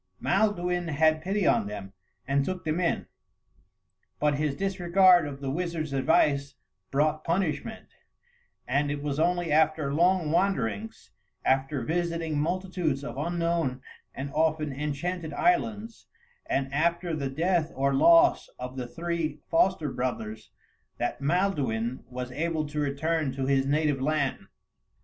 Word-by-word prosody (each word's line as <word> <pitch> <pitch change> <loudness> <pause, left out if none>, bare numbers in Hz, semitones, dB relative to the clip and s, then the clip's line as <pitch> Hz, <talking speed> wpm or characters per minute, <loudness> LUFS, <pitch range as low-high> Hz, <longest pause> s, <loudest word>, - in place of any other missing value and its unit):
Maelduin 180 -4 +1
had 155 +1 +2
pity 195 +3 -1
on - - +3
them 100 -2 -7 0.3
and 140 +1 +2
took 185 +3 -4
them 155 +2 0
in, 175 -2 0 1.1
but 150 0 +2
his 150 -2 0
disregard 185 -2 +4
of 140 -1 -8
the 135 -1 -2
wizard's 165 -2 -3
advice 140 +1 +2 0.3
brought 155 +2 +1
punishment; 175 +4 -2 0.8
and 140 +3 +1
it 145 0 -3
was 145 0 -2
only 175 0 +1
after 155 -2 +2
long 175 0 +2
wanderings, 110 - -1 0.3
after 135 0 +1
visiting 165 0 -1
multitudes 175 -3 -1
of 120 - -6
unknown 170 -3 -1 0.4
and 140 +1 -5
often 155 -1 +1
enchanted 150 +4 -3
islands, 230 -10 0 0.4
and 135 0 -1
after 170 +3 +1
the 140 -3 -2
death 165 +3 0
or 140 +1 +1
loss 335 - +5
of 125 +1 -7
the 125 -1 -4
three 165 0 -3
foster 165 -3 +2
brothers, 110 -4 -4 0.5
that - - -2
Maelduin 140 - 0
was 125 0 -5
able 160 +3 -1
to 150 +1 -4
return 150 +1 0
to 135 0 -2
his 135 0 +2
native 145 -1 +1
land. 145 -1 -1
155 Hz, 130 wpm, -27 LUFS, 140-175 Hz, 1.1 s, loss